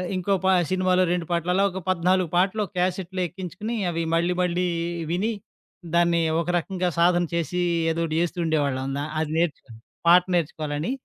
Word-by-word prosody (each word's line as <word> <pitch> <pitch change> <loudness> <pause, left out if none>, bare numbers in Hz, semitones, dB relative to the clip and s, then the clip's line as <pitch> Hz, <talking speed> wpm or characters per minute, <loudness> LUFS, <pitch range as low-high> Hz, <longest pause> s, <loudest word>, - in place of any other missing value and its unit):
ఇంకో 185 +2 0
ప - - +4 0.2
సినిమాలో 185 0 +2
2 175 -2 -2
పాటలు 170 +1 0
అలా 195 - +3
ఒక 190 - -5
14 185 -1 +2
పాటలు 195 +4 +2
ఒక - - -16
క్యాసెట్‌లో 185 0 -1
ఎక్కించుకుని, 190 +6 -6
అవి 165 -1 -2
మళ్లీ 170 +2 +1
మళ్లీ 180 0 0 0.5
విని, 210 +6 0 0.6
దాన్ని 170 0 +3 0.2
ఒక - - -6
రకంగా 180 +1 -2
సాధన 175 0 +4
చేసి, 180 +2 -1 0.3
ఏదోకటి 165 -1 -2
చేస్తూ 175 +1 -2
ఉండేవాళ్లం. 145 -5 0
అందా 140 +1 -2 0.2
అది 155 -1 -2
నేర్చుకొని 140 -9 -2 0.3
పాట 175 +1 +7
నేర్చుకోవాలని. 155 - -2
175 Hz, 160 wpm, -24 LUFS, 165-185 Hz, 0.6 s, పాట